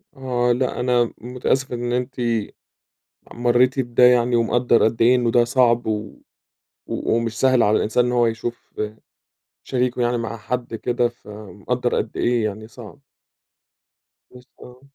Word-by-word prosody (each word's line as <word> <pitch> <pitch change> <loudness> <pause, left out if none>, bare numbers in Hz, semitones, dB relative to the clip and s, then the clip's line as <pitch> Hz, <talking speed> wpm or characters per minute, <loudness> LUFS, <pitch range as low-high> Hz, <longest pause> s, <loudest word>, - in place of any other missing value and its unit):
آه، 125 -2 0
لأ، 125 +1 -1
أنا 120 -1 +1
متأسف 125 +2 -2
إن 120 0 -3
أنتِ 125 +1 -2 1.2
مريتِ 125 +2 +2
بده 120 -1 +1
يعني 125 0 +5
ومقدر 120 +1 +2
قد 110 +1 0
إيه 120 +2 +5
إنه 120 -2 +1
ده 120 - +4
صعب 120 -1 +2
و 110 -1 -4 0.7
و - - -1
ومش 115 -1 -2
سهل 130 -2 +4
على 105 +1 +3
الإنسان 120 +3 +1
إن 125 - -1
هو 120 -1 +3
يشوف 115 +1 -5 0.9
شريكه 125 -1 -1
يعني 120 0 +1
مع 115 0 -4
حد 120 +2 -4
كده، 120 +1 0
فمقدر 105 -4 -5
قد - - -3
إيه 120 -2 +1
يعني 110 +1 -5
صعب. 120 +4 -13 1.3
بس 125 0 -15
آه. 125 +1 -14
120 Hz, 145 wpm, -21 LUFS, 115-125 Hz, 1.3 s, يعني